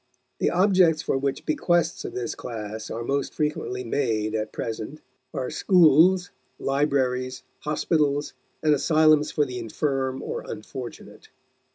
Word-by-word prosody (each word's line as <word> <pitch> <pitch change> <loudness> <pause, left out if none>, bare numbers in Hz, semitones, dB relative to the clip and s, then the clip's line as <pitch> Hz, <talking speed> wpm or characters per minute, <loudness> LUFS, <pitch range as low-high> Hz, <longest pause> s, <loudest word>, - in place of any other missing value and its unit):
The - - +2
objects 180 -4 +4
for - - 0
which 135 0 -2
bequests 175 +2 +1
of - - -6
this 120 -2 -3
class 110 -2 -6
are 115 - -4
most 140 +3 -2
frequently 150 -4 -2
made 115 -4 -1
at 110 -1 -2
present 115 +6 -5 0.3
are - - -3
are - - -4
schools, 180 +1 +5 0.3
libraries, 130 -2 0 0.2
hospitals, 150 -1 0 0.3
and 155 -1 +5
asylums 155 0 +4
for 150 - +1
the 125 -2 -5
infirm 130 +2 -2
or 475 0 -4
unfortunate. 440 -2 -8
140 Hz, 135 wpm, -25 LUFS, 125-155 Hz, 0.3 s, schools